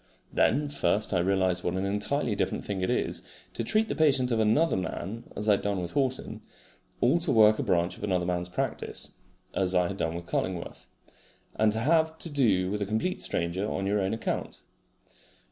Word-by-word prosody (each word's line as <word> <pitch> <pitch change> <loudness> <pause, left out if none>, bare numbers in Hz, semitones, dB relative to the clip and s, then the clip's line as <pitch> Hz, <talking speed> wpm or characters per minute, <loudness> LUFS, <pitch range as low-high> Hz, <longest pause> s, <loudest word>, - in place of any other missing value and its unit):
Then 145 +6 +2
first 110 -7 +1
I 90 - +3
realised 95 -1 +1
what 90 - -1
an 95 +1 -1
entirely 105 +5 0
different 100 - -2
thing 100 -2 -3
it 95 - 0
is - - -1 0.3
to - - -3
treat 215 - +2
the - - -2
patient 135 -5 +2
of 115 - +1
another 110 +10 +3
man 95 +4 -4
(as 105 - -3
I - - +6
had 100 - +3
done 100 -2 -1
with 85 -1 -4
Horton) 130 -2 -2 0.6
or 130 +8 +3
to 170 -3 0
work 110 -1 +6
a - - +2
branch 90 -2 0
of - - -10
another 90 -3 0
man's 90 0 -1
practice 90 - -3 0.3
(as 95 -1 0
I 90 -1 +3
had 100 - -5
done 80 -3 -1
with 85 0 -6
Cullingworth), 90 0 -3 0.7
and 110 0 +3
to 110 - -1
have 160 +3 +2
to 165 - -4
do 100 -10 +2
with 105 0 -2
a - - +1
complete 110 - -1
stranger 90 +5 -1
on 95 - -2
your 100 +1 +1
own 95 +3 0
account. 115 - -4
105 Hz, 200 wpm, -28 LUFS, 95-125 Hz, 0.7 s, I